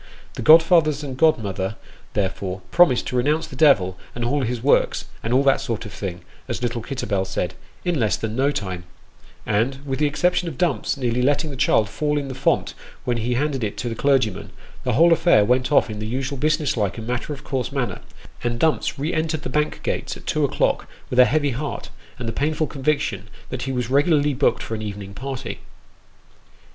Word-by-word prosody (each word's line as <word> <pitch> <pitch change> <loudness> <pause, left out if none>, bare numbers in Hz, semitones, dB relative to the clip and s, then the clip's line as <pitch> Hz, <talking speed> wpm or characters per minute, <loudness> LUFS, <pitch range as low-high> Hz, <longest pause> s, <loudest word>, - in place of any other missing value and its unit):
The - - -6
godfathers 160 -2 +5
and 135 -3 -5
godmother, 110 -9 +1 0.4
therefore, 95 -1 -2
promised 140 -9 +5
to - - -4
renounce 150 +6 +1
the - - -11
devil 100 - +4 0.2
and 120 0 -2
all 140 +4 +1
his 120 -1 -2
works 140 - +2
" - - -24
and 115 - -2
all 130 +3 +4
that 135 -1 +3
sort 115 -4 -3
of 105 - -9
thing 90 0 -5
" - - -28
as - - -3
little 120 -1 -1
Kitterbell 105 -6 -2
said 95 -2 -3 0.2
" - - -30
in 175 -4 +1
less 110 -6 +2
than 110 -1 -4
no 135 +3 +2
time; 95 -10 -4 0.3
" - - -26
and 115 +6 +1
with 135 -1 -3
the 150 - +3
exception 175 +4 +1
of 155 -6 -5
Dumps 170 -5 0
nearly 125 -2 0
letting 145 +3 +1
the - - -6
child 110 -4 +3
fall 150 +6 -1
into 140 -2 -3
the - - -11
font - - +1 0.3
when 120 -1 0
he 120 +2 -1
handed 140 -1 -1
it 105 - -3
to 120 - -3
the - - -3
clergyman, 130 -5 +1 0.3
the 125 - 0
whole 165 +7 +6
affair 160 -11 +4
went 125 +4 +1
off 145 - +5
in 105 -2 -6
the 110 - -4
usual 135 +3 -3
business 155 0 +1
like 105 -3 -1
and 110 - -6
matter 125 +4 -3
of 140 -2 -6
course 130 -1 -2
manner, 135 -4 -2 0.4
and 120 -1 -1
Dumps 155 0 +1
re 150 +6 -2
entered 155 -1 -1
the - - -4
Bank 150 +3 -1
gates - - -2
at - - -15
two - - 0
o'clock - - +1 0.2
with 125 - +2
a 125 - +9
heavy 145 0 +1
heart, 140 +5 -5 0.3
and 120 - -5
the 115 - -2
painful 155 +4 0
conviction 135 -9 -1 0.2
that 130 - -4
he - - 0
was 125 -2 -2
regularly 145 +1 +3
booked 135 +2 +1
for - - -5
an 110 - -3
evening 100 -2 -6
party. 130 -2 -5
130 Hz, 215 wpm, -22 LUFS, 110-145 Hz, 0.4 s, a